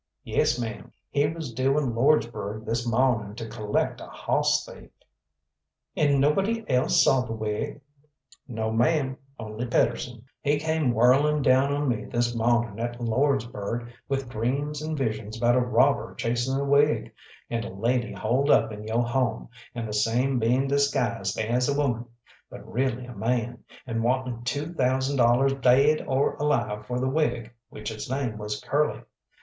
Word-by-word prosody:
"Yes, 125 - +1
ma'am, 110 -3 -5 0.2
he 145 0 +2
was 155 -5 -5
due 135 +4 +1
in 135 -6 0
Lordsburgh 110 -5 +1
this 115 +1 -2
mawning 115 -4 +1
to 115 0 -6
collect 105 -1 -2
a - - -8
hoss - - 0
thief." - - -13 1.1
"And 145 -2 +3
nobody 195 +11 +1
else 125 -1 +3
saw 135 -1 +4
the 120 -3 -5
wig?" 110 +7 -3 0.7
"No, 110 -3 -3
ma'am, 130 +4 +1 0.2
only 110 +2 -5
Pedersen. 120 0 0 0.2
He 145 +1 +2
came 160 -3 0
whirling 135 +6 +3
down 130 +2 +4
on 145 0 0
me 115 -4 -1
this 120 0 -1
mawning 120 -2 +1
at 120 +1 -3
Lordsburgh 120 -2 -1 0.2
with 135 -1 -1
dreams 140 +6 -2
and 155 0 -3
visions 110 -4 -3
about 120 +1 +3
a - - +4
robber 125 -1 +2
chasing 120 +3 -1
a 140 +1 -1
wig, 145 +2 +2 0.4
and 115 -1 -1
a - - -6
lady 120 +5 -1
holed 130 +6 0
up 110 -4 +4
in 105 0 -7
yo' 115 +2 +1
home, 120 -1 -1 0.3
and 115 -2 -3
the 105 - -5
same 120 +5 +1
being 125 +4 +2
disguised 125 -8 0
as 120 +4 +1
a 140 - 0
woman, 120 -5 0 0.4
but 100 +1 -11
really 125 +1 -1
a 125 - -9
man, 120 0 -2 0.2
and 115 -2 -2
wanting 125 -1 -1
two 145 +6 -2
thousand 130 -1 +1
dollars 125 +3 +4
daid 140 +5 +4
or 135 +1 +1
alive 120 -8 -1
for 125 0 -2
the 130 - 0
wig 120 -5 -1 0.2
which 105 +1 -6
its 110 +1 -7
name 130 -5 -2
was 105 0 -4
Curly. 150 +1 0
125 Hz, 165 wpm, -26 LUFS, 115-140 Hz, 1.1 s, saw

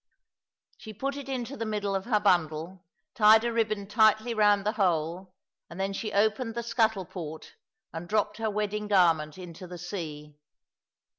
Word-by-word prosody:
She 215 - -9
put 275 +6 -3
it 280 -1 -7
into 260 0 -4
the 230 - -4
middle 210 -2 -2
of 195 -1 -2
her 225 -3 +2
bundle, 175 -2 0 0.3
tied 220 -2 +6
a 235 0 -1
ribbon 215 -3 0
tightly 220 +2 +3
round 205 -2 +3
the 210 - +2
whole, 180 -2 -1 0.3
and 170 - -10
then 195 +1 -1
she 215 +2 -4
opened 220 +3 +1
the 235 - -3
scuttle 220 -4 +1
port 160 -3 -8 0.4
and 165 +2 -7
dropped 210 0 0
her 225 -1 -1
wedding 210 0 -2
garment 165 -6 +3
into 180 0 -9
the 180 0 -8
sea. 155 -5 -7
205 Hz, 165 wpm, -28 LUFS, 175-220 Hz, 0.4 s, tied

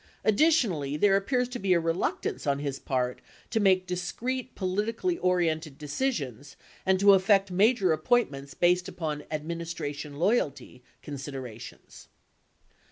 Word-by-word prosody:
Addi 215 +9 +5
tionally, 160 - +1
there 200 +1 +5
appears 250 +6 +1
to 250 0 -5
be 190 -3 +2
a 170 - +4
reluctance 165 -2 -2
on 140 -1 +2
his 140 -1 -4
part 125 -1 -2 0.3
to 225 - +1
make 190 -3 +3
discrete 235 +9 -3
politically 220 - -1
oriented 165 -5 0
decisions 145 - -3 0.3
and 190 0 +3
to 200 0 +7
effect 195 0 +3
major 195 -1 +3
appointments 155 - 0
based 180 0 +2
upon 155 -4 -4
administration 155 -2 -5
loyalty 170 - 0 0.2
consider 140 -2 -6
ations." 120 -1 -11
180 Hz, 130 wpm, -28 LUFS, 145-205 Hz, 0.3 s, to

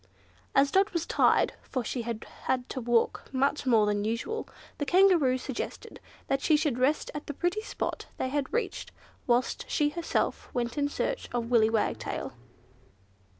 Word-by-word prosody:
As 275 0 +4
Dot 390 +1 +3
was 335 -1 -1
tired - - +3
(for 255 - -3
she 245 +2 -3
had 230 -1 -4 0.2
had 255 -1 0
to 260 - -4
walk 235 -1 +1
much 275 +1 0
more 225 -4 +5
than 205 0 0
usual) 230 - -3 0.3
the 290 - 0
Kangaroo 350 -9 +5
suggested 260 -1 -6 0.3
that 270 0 0
she 310 0 +4
should 295 -5 0
rest 275 +4 +1
at 295 - -6
the 290 - -5
pretty 355 +7 0
spot - - -4
they 260 - -1
had 280 0 -2
reached, 475 - -2 0.4
whilst 245 +1 +1
she 295 -2 +2
herself 335 +2 -2
went 240 -1 -1
in 285 -1 +1
search - - -2
of 235 0 -2
Willy 220 -2 +5
Wagtail. 225 -1 -1
265 Hz, 165 wpm, -29 LUFS, 240-310 Hz, 0.4 s, more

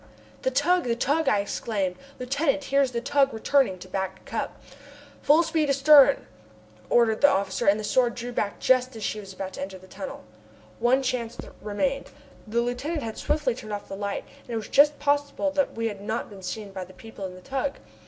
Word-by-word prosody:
"The - - +1
tug! 310 +7 +2
The 235 -1 +1
tug!" 295 +6 +1
I 205 - +3
exclaimed. 200 -2 -2 0.2
"Lieutenant, 275 +3 0
here 275 0 +2
is 265 -2 +1
the 235 -1 -2
tug 275 +1 +2
returning 235 -4 +2
to 185 - -11
Back 190 0 -4
Cup!" - - -4 0.6
"Full 305 +4 +5
speed 320 -3 0
astern," 280 0 +6 0.6
ordered 230 -2 +3
the 285 - +8
officer, 190 -3 0
and 200 +2 +5
the - - -4
Sword 240 +2 +2
drew 245 0 -5
back 205 -4 -2
just 255 -1 +3
as 220 - -7
she 215 - -2
was 195 -2 -9
about 190 0 -6
to - - -7
enter 190 0 -5
the 185 - -16
tunnel. 190 +1 -8 0.6
One 255 +3 +3
chance 245 -3 -2 0.2
remained. 270 +7 -1 0.4
The 235 +2 +1
lieutenant 275 +6 -2
had 225 -1 -5
swiftly 295 -4 0
turned 215 -3 -8
off 205 - -5
the 195 - -5
light, 200 0 -3 0.2
and - - -24
it 235 - -3
was 220 - -5
just 290 +1 +5
possible 285 0 0
that 285 -1 0
we 230 0 -2
had 205 -3 -6
not 220 +2 -3
been 195 -2 -11
seen 200 +2 -5
by 190 -1 -5
the 185 +1 -13
people 215 -2 -8
in 180 - -10
the 185 - -12
tug. 275 +4 -2
240 Hz, 210 wpm, -26 LUFS, 205-280 Hz, 0.6 s, the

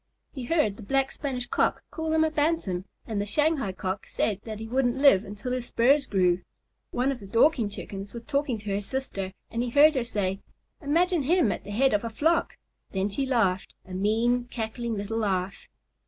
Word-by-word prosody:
He 260 -4 -5
heard 235 -9 +1
the - - -10
Black 270 +5 +1
Spanish 255 -4 -4
Cock - - 0
call 320 -1 -3
him 315 0 +4
a 315 - +1
Bantam, 295 - 0 0.2
and 215 -3 -2
the - - -2
Shanghai 295 -2 +1
Cock 190 +1 -4
say 205 -3 -1
that 220 -2 -5
he 225 - -6
wouldn't 245 +1 +1
live 270 -9 +6
until 205 +4 -6
his 250 -1 -2
spurs 275 +4 +3
grew. 180 -2 +2 0.5
One 255 +3 0
of 265 - -4
the 200 - -10
Dorking 230 +1 +3
Chickens 200 0 -7
was 235 -1 -8
talking 280 -3 0
to 210 -1 -5
her 200 - 0
sister, 200 -5 -4 0.2
and 230 - -1
he 245 - -1
heard 295 +5 +6
her 260 -4 0
say, 195 -5 -2 0.4
"Imagine 335 +3 +2
him 290 - +3
at - - -4
the - - -9
head 260 +5 +2
of 210 - +1
a 230 - -2
flock!" 320 +9 +1 0.3
Then 195 +1 0
she 270 +7 -2
laughed, 200 -8 +1
a 185 - -9
mean, 225 +6 +1
cackling 235 -1 -4
little 205 +2 -3
laugh. 195 -3 -2
235 Hz, 200 wpm, -27 LUFS, 200-275 Hz, 0.5 s, live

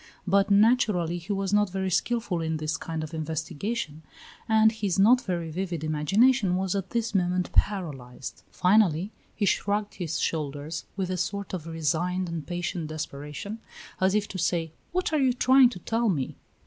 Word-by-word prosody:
But, 200 +1 +3
naturally, 200 -5 +3
he 175 +5 -6
was 195 0 -1
not 210 -1 +3
very 190 0 -2
skilful 210 -2 0
in 160 0 -1
this 155 0 -2
kind 160 -1 -4
of 155 +1 -7
investigation, 160 +2 -3 0.5
and 220 0 +5
his 205 -5 -2
not 235 +6 +6
very 170 -6 -3
vivid 175 -2 -3
imagination 190 - +3
was 190 0 0
at 195 -2 -3
this 230 -2 -1
moment 180 -1 +1
paralyzed. 145 -12 -2
Finally, 185 -1 +3 0.2
he 210 - 0
shrugged 205 +1 0
his 165 -4 -3
shoulders 150 0 -3
with 185 -1 -1
a 185 - -1
sort 200 +2 -3
of 170 -3 -4
resigned 165 +3 -1
and 165 -3 -5
patient 175 -2 -3
desperation, 155 +7 -6 0.4
as 190 +1 +3
if 210 -1 +1
to 185 - -5
say, 170 -2 0 0.2
"What 360 -2 -1
are 310 - +3
you 260 -2 +3
trying 260 0 +6
to 240 - -8
tell 225 +5 0
me?" 145 -9 -1
185 Hz, 170 wpm, -27 LUFS, 160-210 Hz, 0.5 s, not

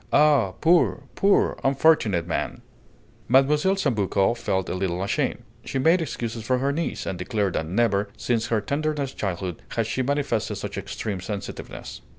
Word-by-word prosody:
Ah! 145 -10 +4
poor, 170 +1 +3
poor, 200 0 +2
unfortunate 135 - +3
man!" 85 - -3 0.6
Mlle. 135 +4 +5 0.2
Sambucco 105 - +1
felt 95 -5 -1
a - - -2
little 90 -1 -1
ashamed. 100 - -1 0.2
She - - -3
made 165 +6 +4
excuses 115 -6 -4
for 130 +3 +1
her 135 +2 0
niece, 165 +3 -3
and 90 - -4
declared 105 -6 -1
that 80 - -2
never, 100 +1 +1
since 115 -2 0
her 115 -2 +1
tenderest 140 +3 -2
childhood, 90 -3 -3
had 115 - +1
she 115 +4 -1
manifested 140 -4 -1
such - - -5
extreme 100 -4 -4
sensitiveness 100 +1 -7
115 Hz, 155 wpm, -25 LUFS, 100-140 Hz, 0.6 s, Mlle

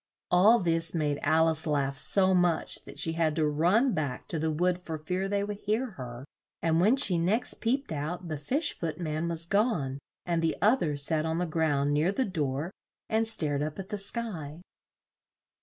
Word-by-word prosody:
All 200 +7 +6
this 165 -3 +1
made 150 -3 0
Al 160 +1 +3
ice 160 0 -1
laugh 140 -2 0
so 190 +6 +3
much 175 -2 0
that - - -11
she 165 - -1
had 160 -2 +1
to 160 -2 +1
run 180 - +2
back 145 -5 -3
to 160 - -2
the 160 +1 0
wood 175 +3 +1
for 160 -3 -5
fear 180 +5 -2
they 200 0 0
would 205 0 -5
hear 220 +5 -1
her, 125 - -8 0.3
and 165 0 +2
when 215 +8 +5
she 185 -10 +3
next 210 +9 0
peeped 260 +2 -1
out 160 +4 -4
the 155 - -3
Fish 265 - 0
Foot 160 -1 -5
man 155 -1 -2
was 165 -1 -1
gone, 175 - 0 0.3
and 170 -1 0
the 165 -1 0
oth 235 +6 +3
er 150 -3 -1
sat 155 +2 0
on 160 0 -1
the 180 - 0
ground 150 -3 +1
near 155 +5 +2
the 260 +6 0
door 155 - -2 0.4
and 225 0 +1
stared 150 -10 +1
up 150 0 -3
at 195 -1 -7
the 210 - -3
sky. 185 -8 -5
165 Hz, 200 wpm, -28 LUFS, 155-195 Hz, 0.4 s, All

